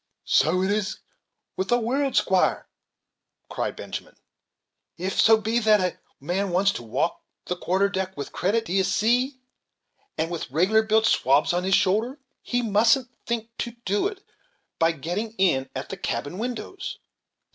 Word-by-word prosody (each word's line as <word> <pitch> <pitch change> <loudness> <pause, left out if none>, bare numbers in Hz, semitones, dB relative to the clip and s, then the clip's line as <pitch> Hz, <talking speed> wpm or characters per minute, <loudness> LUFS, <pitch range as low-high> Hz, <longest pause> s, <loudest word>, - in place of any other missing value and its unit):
"So 335 - +3
it 190 - 0
goes 205 -1 -1 0.6
with 190 - -2
the 240 - +3
world, 265 +4 0
squire," 190 -1 +2 0.8
cried - - -2
Benjamin; - - -7 0.8
"if 185 +2 0
so 225 0 +7
be 220 +2 0
that 215 -2 +4
a 180 -1 -1 0.2
man 185 +7 -1
wants 190 +3 +3
to - - -6
walk 110 - -1 0.2
the 180 - -2
quarter 190 +3 +1
deck 190 -2 -3
with 140 - -5
credit, 225 +5 0
d'ye 190 -1 +1
see, 240 +8 +1 0.8
and 165 +2 -1
with 170 -6 -4
regular 185 +10 +3
built 220 0 +2
swabs 140 -4 +3
on 180 +1 0
his 190 0 +4
shoulders, 220 +8 +1 0.2
he 245 0 -1
mustn't 230 +4 +3 0.2
think 230 -1 -3
to 235 0 -3
do 205 - +1
it 405 -1 -8 0.6
by 165 0 +4
getting 175 +9 -4
in 135 -9 +2
at 130 0 -5
the - - -5
cabin 145 - -3
windows. 250 - -5
200 Hz, 155 wpm, -25 LUFS, 180-230 Hz, 0.8 s, so